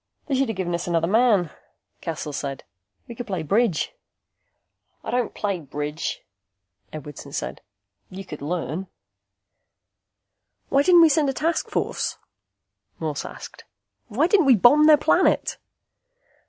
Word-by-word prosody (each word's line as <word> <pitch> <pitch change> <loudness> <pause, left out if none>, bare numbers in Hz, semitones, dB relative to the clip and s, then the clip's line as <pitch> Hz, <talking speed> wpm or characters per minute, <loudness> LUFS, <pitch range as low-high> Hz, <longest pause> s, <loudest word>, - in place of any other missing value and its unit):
"They 285 - -3
should 265 -2 +1
have 225 - -2
given 180 -2 -2
us 170 +1 -3
another 165 -1 +1
man," 205 -4 +3 0.5
Cassel 155 -3 -5
said. 135 -1 -5 0.4
"We 235 - -7
could 245 +1 -7
play 185 -5 -3
bridge." 195 - +1 1.1
"I - - -5
don't 245 -2 -1
play 200 -3 -2
bridge," 150 +1 -5 0.7
Edwardson 145 -2 -9
said. - - -4 0.5
"You 190 +1 -8
could 150 -5 -9
learn." 170 +3 -3 1.8
"Why 275 - +4
didn't 350 +3 +6
we 325 - +6
send 295 -1 +2
a - - -1
task 325 +5 -1
force?" - - -2 0.8
Morse 155 -3 -3
asked. - - -10 0.4
"Why 250 +7 +1
didn't 365 -4 +3
we 260 - +7
bomb 285 +9 +6
their 305 -1 +8
planet?" - - +2
195 Hz, 135 wpm, -23 LUFS, -, 1.8 s, their